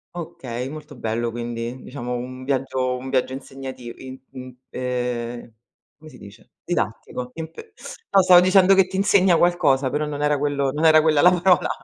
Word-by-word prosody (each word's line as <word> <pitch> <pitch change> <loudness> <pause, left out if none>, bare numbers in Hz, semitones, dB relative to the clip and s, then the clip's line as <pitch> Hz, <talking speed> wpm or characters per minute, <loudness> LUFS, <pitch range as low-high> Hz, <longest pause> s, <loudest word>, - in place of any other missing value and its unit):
Okay, 130 -7 -6
molto 150 0 -10
bello 115 +1 -2
quindi, 120 +1 -5
diciamo 125 -2 -6
un 130 +1 -7
viaggio 130 -1 -1
un 130 +1 -7
viaggio 130 0 0
insegnativ 130 -3 -8
im 130 0 -9
im 130 -1 -10 0.2
uhm, 125 -2 -4 0.5
come 155 0 -13
si 125 - -15
dice, 100 0 -15
didattico 125 0 -3
impe 165 - -9 0.4
no, 195 - +5
stavo 180 -1 +8
dicendo 185 +1 +5
che 190 -1 +4
ti 190 - -8
insegna 190 -3 +4
qualcosa, 140 -7 +2
però 150 +1 -1
non 145 0 -4
era 150 -1 +1
quello 140 -2 0
non 155 +3 -1
era 155 -1 +7
quella 155 -2 +3
la 180 - +7
parola! 180 -1 +2
135 Hz, 170 wpm, -22 LUFS, 125-160 Hz, 0.5 s, stavo